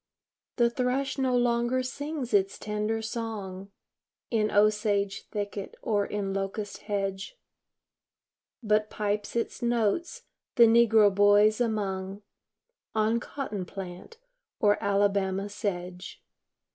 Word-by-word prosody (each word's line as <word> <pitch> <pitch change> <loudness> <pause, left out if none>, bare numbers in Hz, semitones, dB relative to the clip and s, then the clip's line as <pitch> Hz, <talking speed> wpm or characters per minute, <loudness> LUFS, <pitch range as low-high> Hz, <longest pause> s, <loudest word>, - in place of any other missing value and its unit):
The 235 -2 +3
thrush 260 +2 -1
no 255 -2 +2
longer 240 +1 +1
sings 285 0 -5
its 195 -1 +2
tender 210 +1 -2
song 210 -4 -5 0.6
In 215 -2 +2
osage 205 -1 +1
thicket, 205 -1 -5
or 205 -2 +1
in 200 -2 -3
locust 195 +1 -4
hedge, 195 - -3 1.3
But 215 0 +2
pipes 210 0 -2
its 230 - -2
notes 240 - 0 0.3
the 235 - +7
negro 225 -3 +5
boys 205 +3 +5
among, 200 -3 -2 0.7
On 220 +2 +2
cotton 235 -7 -5
plant, 185 - -9 0.4
or 205 0 +3
Alabama 200 -1 +1
sedge. 180 -3 -5
210 Hz, 105 wpm, -28 LUFS, 200-235 Hz, 1.3 s, the